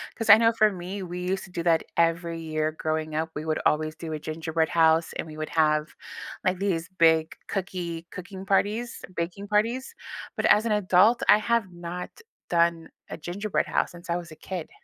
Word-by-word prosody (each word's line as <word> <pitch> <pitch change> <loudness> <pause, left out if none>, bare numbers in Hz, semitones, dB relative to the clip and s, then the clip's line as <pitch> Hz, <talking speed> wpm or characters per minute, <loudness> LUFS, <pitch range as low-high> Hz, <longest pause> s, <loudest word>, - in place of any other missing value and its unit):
'Cause 225 -1 -4
I 205 - +11
know 230 0 +4
for 215 -1 +4
me, 190 +1 -6
we 180 0 -6
used 190 +1 -1
to 190 - -12
do 175 - -3
that 165 -1 +3
every 170 0 +1
year 155 -1 -1
growing 155 0 -3
up. 160 +1 -1
We 150 - -4
would 155 0 -1
always 155 +1 +1
do 160 -1 -6
a 155 - -3
gingerbread 160 +1 -2
house, 165 0 +3
and - - -4
we 155 - -9
would 155 0 -5
have, 155 -1 +1 0.5
like, 185 0 +2
these 180 -4 -1
big 160 -4 +3
cookie 175 -3 -4
cooking 190 +1 -8
parties, 210 +5 0
baking 180 +4 -4
parties. 230 +5 0 0.4
But - - 0
as 210 +2 +5
an 230 - 0
adult, 210 +3 +4
I 210 - +7
have 230 -2 +1
not 175 +1 -6 0.4
done 170 -1 +2 0.2
a - - -6
gingerbread 185 +6 -2
house - - 0
since 175 0 -13
I 170 - +1
was 175 -1 -6
a - - -10
kid. 180 0 -6
175 Hz, 200 wpm, -26 LUFS, 160-195 Hz, 0.5 s, I